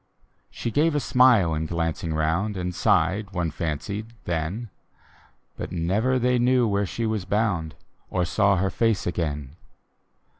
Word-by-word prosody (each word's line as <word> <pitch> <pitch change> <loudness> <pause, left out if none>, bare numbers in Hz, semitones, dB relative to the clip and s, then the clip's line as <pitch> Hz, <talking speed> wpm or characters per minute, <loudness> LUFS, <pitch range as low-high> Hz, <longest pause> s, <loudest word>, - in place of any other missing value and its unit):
She 115 - -4
gave 150 +5 +2
a - - +3
smile 125 - +4
in 80 0 -2
glancing 80 0 -2
round, 85 +7 0
And 90 0 -3
sighed, 100 +3 +1
one 85 -3 -1
fancied, 95 +9 -4
then 90 +7 -3 0.4
— - - -32
But - - -5
never 100 +10 +1
they 125 0 +2
knew 125 0 +3
where 100 -1 0
she 115 +5 -3
was 110 -3 -1
bound, 95 -6 -1 0.3
Or 90 -1 0
saw 100 +2 +3
her 95 +1 0
face 115 -4 +1
again. 75 -4 -3
95 Hz, 150 wpm, -25 LUFS, 85-115 Hz, 0.4 s, smile